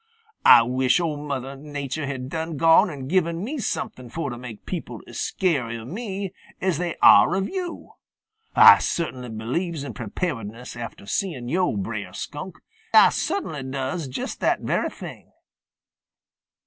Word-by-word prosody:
Ah 115 - +9
wish 130 +5 +2
Ol' 150 -3 -3
Mother 135 -1 -4
Nature 145 0 -5
had 130 -2 -4
done 160 +1 -4
gone 165 +4 +5
and 135 -5 -7
given 170 +1 +1
me 280 +7 -4
something 130 - -4
fo' 165 +7 -3
to 120 - -5
make 120 -4 -9
people - - -5
as - - -8
scary 135 -11 0
of 115 +1 -9
me 195 -2 -4 0.3
as 185 -4 0
they 175 -2 -2
are 180 - +8
of 195 0 0
yo'. 365 -3 -6 0.6
Ah - - +10
cert'nly 130 -7 -3
believes 140 +9 -3
in 145 - -6
preparedness 120 - -5
after 115 -3 -8
seein' 130 - -2
yo', 175 - +1
Brer 100 -2 -4
Skunk. 155 - -7 0.4
Ah - - +9
cert'nly 160 - -2
does 135 +4 -3
just 130 - -5
that - - +1
very - - 0
thing. - - -10
145 Hz, 150 wpm, -24 LUFS, 125-175 Hz, 0.6 s, Ah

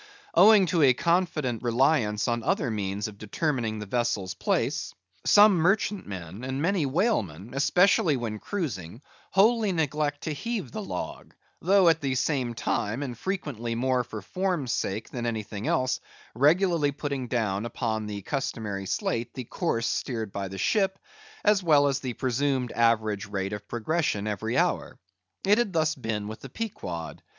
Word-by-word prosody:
Owing 210 -2 +7
to 170 0 +1
a 130 -4 +6
confident 155 -5 0
reliance 120 -3 +2
upon 120 -1 0
other 115 - 0
means 100 -1 -2
of 100 -2 -11
determining 115 0 -1
the 105 - -5
vessel's 105 -4 -1
place, - - -1 0.3
some 205 0 +8
merchantmen, 125 - -1
and 130 +1 -3
many 170 -1 +1
whalemen, 120 - 0
especially 160 +1 +3
when 110 -3 -4
cruising, 120 - -4 0.3
wholly 215 +1 +4
neglect 150 -3 -1
to 155 - -3
heave 225 +7 -4
the 220 - -4
log; 200 - -6 0.3
though 195 -1 +5
at 165 -1 +4
the 135 -2 -1
same 130 -2 0
time, 115 +3 -1
and 125 -4 -5
frequently 130 - -3
more 125 +1 +1
for 110 -3 -8
form's 180 - -1
sake 105 +3 -2
than 120 -1 -3
anything 110 -2 -4
else, 130 0 +1 0.3
regularly 155 - +3
putting 140 -3 -4
down 110 -4 -1
upon 110 -3 -2
the 100 -2 -5
customary 105 -7 -3
slate 115 +5 -2
the 130 - -4
course 115 -3 -1
steered 115 -6 -2
by 100 0 -3
the 95 +1 -7
ship, 195 - +1 0.5
as 210 -1 +4
well 150 -5 +5
as 140 -1 0
the 130 -2 -4
presumed 130 0 0
average 110 -3 +1
rate 100 0 -3
of 105 0 -7
progression 120 -3 -1
every 110 +3 -2
hour. - - 0 0.5
It 205 +3 +5
had 240 -5 +1
been 165 - +1
thus 155 0 +1
with 110 -3 -4
the 135 - -10
Pequod. 95 - -5
130 Hz, 160 wpm, -27 LUFS, 110-165 Hz, 0.5 s, some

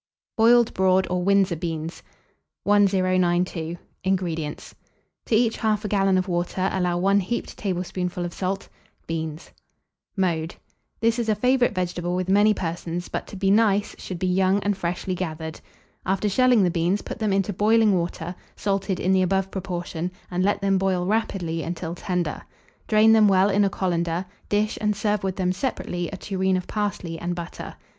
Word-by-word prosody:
BOILED 235 +1 +5
BROAD 190 0 +3
OR 180 0 0
WINDSOR 195 -2 +3
BEANS. 165 -1 -4 0.6
1092. 185 -4 +2 0.3
INGREDIENTS. 170 -5 -2 0.5
To 225 - +2
each 225 0 +2
1/2 215 -1 0
gallon 195 -2 +3
of 185 +1 0
water, 180 +1 -1
allow 180 -2 0
1 195 +3 +3
heaped 220 +5 -3
tablespoonful 180 -1 -3
of 175 - -5
salt; 190 +1 -3 0.4
beans. 160 -1 -5
[Illustration: - - -32 0.6
BROAD 190 - +3
BEAN.] 160 -1 -2
Mode. 160 +2 -7 0.5
This 230 +1 +2
is 230 -2 -1
a 215 - +3
favourite 250 +1 +2
vegetable 175 -1 -2
with 185 0 -2
many 205 +2 +5
persons, 175 -2 -3
but - - -4
to - - -9
be 195 0 +1
nice, 205 -1 +3
should 185 - -6
be 185 - -2
young 185 +1 +3
and 205 0 +1
freshly 180 0 -3
gathered. 160 -3 -5 0.4
After 195 +3 0
shelling 245 +1 +4
the 180 - +2
beans, 175 +4 0
put - - -7
them 215 -2 0
into 195 +1 +1
boiling 215 +1 +4
water, 175 0 -3 0.2
salted 195 -2 -1
in 185 - +1
the 190 0 +4
above 190 +1 +1
proportion, 175 -2 -4 0.2
and 180 +1 0
let 205 +1 +1
them 195 -1 +2
boil 185 -2 0
rapidly 185 -6 -1
until 165 0 -4
tender. 175 -3 -2 0.5
Drain 220 +1 +5
them 215 -1 +6
well 195 +1 +4
in 200 +1 +3
a 200 - +3
colander; 175 -1 -1 0.2
dish, 210 +1 0
and 210 -1 +1
serve 205 0 0
with 190 -1 -1
them 185 -1 0
separately 180 -6 -3
a 195 - -6
tureen 190 -1 0
of 180 - -4
parsley 200 -6 -3
and 175 +1 -3
butter. 170 0 -7
190 Hz, 175 wpm, -24 LUFS, 175-205 Hz, 0.6 s, them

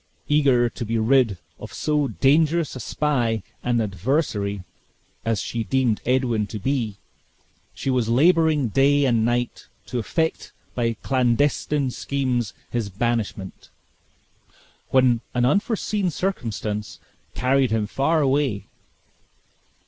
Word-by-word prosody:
Eager 135 -5 +3
to 120 - -6
be 115 +1 -1
rid 115 -3 +3 0.2
of - - -9
so 150 -2 0
dangerous 150 - +2
a - - -6
spy 120 -4 0 0.2
and 120 -1 +1
adversary 100 - -1 0.6
as 115 -3 0
she 115 -1 -3
deemed 125 -2 +1
Edwin 125 -5 +1
to 105 - -6
be, 115 -2 -2 0.8
she 135 - -2
was 125 -3 0
laboring 155 0 +3
day 140 +5 +3
and 115 -4 +2
night 120 +1 -1 0.2
to 125 - -3
effect 160 +9 -2 0.2
by 115 -2 0
clandestine 135 +2 +1
schemes 125 -6 -2 0.2
his 115 -4 -2
banishment, 105 -2 -3 1.2
when 125 -3 +3
an 125 0 +3
unforeseen 200 - 0
circumstance 110 - -3 0.4
carried 130 0 +2
him 110 -1 0
far 145 +9 +1
away. 135 -6 +1
125 Hz, 115 wpm, -23 LUFS, 115-140 Hz, 1.2 s, Eager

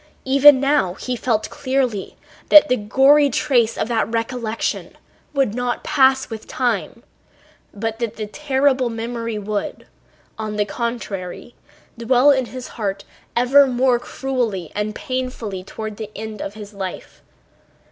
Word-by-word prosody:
Even 275 +1 +7
now 275 -10 +1
he 250 +4 -4
felt 225 -2 -1
clearly 260 -7 -2 0.3
that 300 0 +8
the 255 - +4
gory 270 +7 +4
trace 235 -5 +1
of - - -1
that 225 -2 0
recollection 230 -1 -3 0.3
would 275 -7 +1
not 245 0 -2
pass 265 -3 +3
with 220 -2 -8
time, 250 -2 -2 0.7
but 225 +2 -4
that 230 -2 -3
the 215 - -4
terrible 265 +1 +1
memory 230 0 -4
would, 210 0 -4 0.5
on 215 -1 -4
the 210 0 +1
contrary, 230 -3 -5 0.5
dwell 250 +4 +4
in 265 -2 +2
his 255 0 -8
heart 200 -3 -4 0.3
ever 265 +4 +5
more 250 -1 +2
cruelly 240 - -3
and 210 +1 -3
painfully 255 -9 -4
to 215 +3 -6
the 215 0 -7
end 215 -1 -6
of 200 - -6
his 210 -1 -10
life. 190 -2 -7
235 Hz, 135 wpm, -20 LUFS, 215-265 Hz, 0.7 s, that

